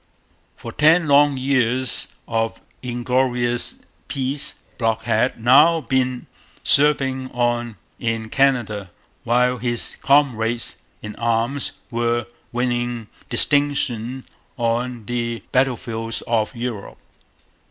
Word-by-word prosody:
For -, -, -8 dB
ten 160 Hz, +2 st, +4 dB
long 145 Hz, -1 st, +5 dB
years 130 Hz, -1 st, +1 dB, 0.2 s
of 115 Hz, -1 st, -1 dB, 0.2 s
inglorious 125 Hz, -1 st, 0 dB, 0.3 s
peace 135 Hz, +1 st, -2 dB, 0.2 s
Brock 115 Hz, -1 st, 0 dB
had 115 Hz, +2 st, +1 dB
now 145 Hz, +8 st, +5 dB
been 130 Hz, -1 st, -1 dB, 0.4 s
serving 135 Hz, -3 st, +2 dB
on 120 Hz, -2 st, 0 dB, 0.2 s
in 115 Hz, -1 st, -2 dB
Canada, 115 Hz, -8 st, +1 dB, 0.4 s
while 125 Hz, +1 st, +2 dB
his 120 Hz, 0 st, -2 dB
comrades 120 Hz, -5 st, +2 dB, 0.3 s
in 105 Hz, 0 st, -7 dB
arms 115 Hz, +4 st, 0 dB, 0.2 s
were 120 Hz, 0 st, 0 dB, 0.3 s
winning 120 Hz, -2 st, -2 dB, 0.2 s
distinction 130 Hz, -4 st, +2 dB, 0.3 s
on 120 Hz, -1 st, -1 dB
the 115 Hz, -2 st, -3 dB
battlefields 115 Hz, -3 st, -1 dB
of 115 Hz, +1 st, -1 dB
Europe. 115 Hz, -4 st, -5 dB
120 Hz, 95 wpm, -21 LUFS, 115-130 Hz, 0.4 s, long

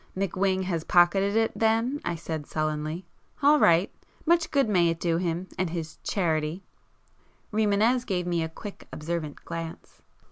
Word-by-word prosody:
"McWhing 190 Hz, 0 st, 0 dB
has 170 Hz, -4 st, -2 dB
pocketed 195 Hz, +4 st, +4 dB
it 225 Hz, 0 st, +2 dB
then,"—I 225 Hz, -1 st, +1 dB
said 160 Hz, -2 st, -5 dB
sullenly—"All 155 Hz, -, 0 dB
right! 170 Hz, -2 st, +4 dB, 0.3 s
Much 335 Hz, 0 st, +3 dB
good 275 Hz, -4 st, +2 dB
may 180 Hz, -5 st, +3 dB
it 165 Hz, 0 st, -2 dB
do 165 Hz, -1 st, +1 dB
him, 175 Hz, +1 st, -2 dB
and 185 Hz, -2 st, +1 dB
his 160 Hz, -1 st, -5 dB
'charity'!" 160 Hz, -1 st, -1 dB, 0.9 s
Rimânez 220 Hz, +3 st, +3 dB
gave 180 Hz, -4 st, -1 dB
me 175 Hz, -1 st, 0 dB
a 160 Hz, -, -2 dB
quick 200 Hz, +5 st, -9 dB
observant 155 Hz, -1 st, -4 dB
glance. 165 Hz, -1 st, -7 dB
175 Hz, 140 wpm, -27 LUFS, 165-205 Hz, 0.9 s, pocketed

